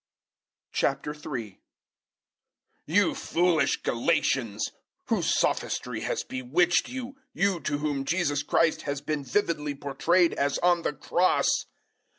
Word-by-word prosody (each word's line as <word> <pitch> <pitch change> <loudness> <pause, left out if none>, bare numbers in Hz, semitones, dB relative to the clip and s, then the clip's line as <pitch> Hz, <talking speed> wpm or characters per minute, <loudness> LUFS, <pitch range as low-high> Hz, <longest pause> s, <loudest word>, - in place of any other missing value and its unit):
003:001 135 -7 -2 1.3
You - - +3
foolish 175 -1 +1
Galatians! 115 -4 0 0.4
Whose - - +1
sophistry - - -1
has - - -2
bewitched 155 +8 +1
you 260 +1 -6 0.2
you 195 -3 +1
to 145 - -2
whom 145 -2 -2
Jesus 145 -3 +1
Christ 160 +2 +2
has 140 -1 -3
been 145 0 -3
vividly 150 -1 -1
portrayed 165 +5 +2
as 140 0 0
on 175 -1 +3
the 150 - -1
Cross? 180 +4 +1
150 Hz, 110 wpm, -27 LUFS, 140-175 Hz, 1.3 s, You